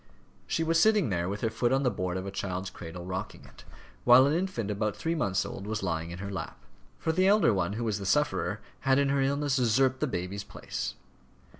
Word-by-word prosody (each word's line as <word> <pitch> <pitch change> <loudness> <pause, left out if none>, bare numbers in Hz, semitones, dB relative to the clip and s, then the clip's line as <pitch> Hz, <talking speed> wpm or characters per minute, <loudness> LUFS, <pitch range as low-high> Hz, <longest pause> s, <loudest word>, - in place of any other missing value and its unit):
She 165 - 0
was 165 0 +2
sitting 210 - +4
there 85 0 0
with 100 +1 -4
her 115 - 0
foot 120 +2 0
on 135 +1 +2
the 125 - +2
board 90 -2 -2
of 95 - -4
a 100 - -4
child's 95 -1 -4
cradle, 85 +1 -8
rocking 95 +1 -5
it, - - -16 0.4
while 125 +2 +8
an 140 - +2
infant 160 - -1
about 105 0 -1
three 165 - -2
months 100 - 0
old 100 - -7
was 110 -1 -3
lying 85 -2 -2
in 85 - -7
her 100 +2 -5
lap. 95 - -5 0.4
For 160 - -1
the 185 +3 +3
elder 205 - +5
one, 95 -1 0
who 115 +3 -3
was 110 -3 -1
the 100 - -6
sufferer, 150 -7 +1 0.2
had 135 -1 +3
in 140 -1 +2
her 140 0 +2
illness 140 0 +1
usurped 130 +2 +3
the 150 - 0
baby's 95 -2 -4
place. - - -5
110 Hz, 230 wpm, -29 LUFS, 95-140 Hz, 0.4 s, while